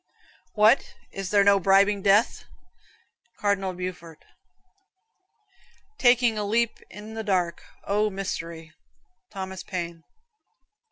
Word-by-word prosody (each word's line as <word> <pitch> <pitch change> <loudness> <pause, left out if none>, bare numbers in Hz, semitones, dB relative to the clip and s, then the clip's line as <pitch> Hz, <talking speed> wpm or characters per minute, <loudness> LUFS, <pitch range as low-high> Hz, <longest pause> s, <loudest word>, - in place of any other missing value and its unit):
"What, 215 +4 +3 0.2
is 195 -1 -5
there 205 -1 +4
no 200 0 +5
bribing 195 +2 +3
death?" 200 +3 +2 0.9
Cardinal 195 -2 0
Beaufort. 175 -3 -8 1.7
"Taking 245 -3 +3
a - - -1
leap 230 +3 0
in 210 +1 -10
the 220 0 -5
dark. 180 -4 -1 0.2
O, 210 +2 +1
mystery." 165 -5 -6 0.6
Thomas 190 -2 -6
Paine. 170 -3 -6
195 Hz, 100 wpm, -25 LUFS, 185-210 Hz, 1.7 s, no